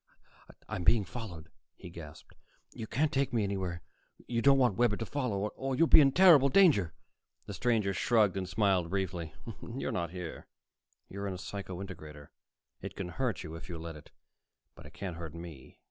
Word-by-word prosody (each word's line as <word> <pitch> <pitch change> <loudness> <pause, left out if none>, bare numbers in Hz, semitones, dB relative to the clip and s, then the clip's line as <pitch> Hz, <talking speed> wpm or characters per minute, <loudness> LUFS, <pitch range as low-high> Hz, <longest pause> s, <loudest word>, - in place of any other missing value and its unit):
"I'm 90 - -4
being 100 +4 +4
followed," 85 -6 -8 0.2
he 90 - -11
gasped. 75 -3 -11 0.4
"You 110 - -6
can't 145 +6 +1
take 135 0 +1
me 115 -3 +1
anywhere 95 -3 -3 0.4
you 115 -1 -1
don't 135 +2 +6
want 125 -7 +3
Webber 120 -1 +2
to 115 - -3
follow, 105 -7 -2
or 135 +3 -3
you'll 165 - +4
be 155 - +8
in 135 -1 +5
terrible 160 -5 +7
danger." 135 - +4 0.5
The - - -7
stranger 110 -5 +1
shrugged 105 -1 +3
and 95 -1 -3
smiled 95 -4 +2
briefly. 90 -4 -3 0.3
"You're 120 +4 -4
not 85 -2 -2
here. 90 -1 -7 0.6
You're 100 +1 -5
in 95 - -3
a - - -6
psycho 95 -1 -6
integrator. 75 -6 -10 0.5
It - - -7
can 90 - -5
hurt 120 -2 -2
you, 80 - -8
if 80 +4 -9
you 85 - -5
let 80 0 -7
it. 75 - -13 0.6
But - - -13
it - - -16
can't 95 -4 -5
hurt 85 -2 -7
me." 85 -6 -10
95 Hz, 185 wpm, -31 LUFS, 85-120 Hz, 0.6 s, be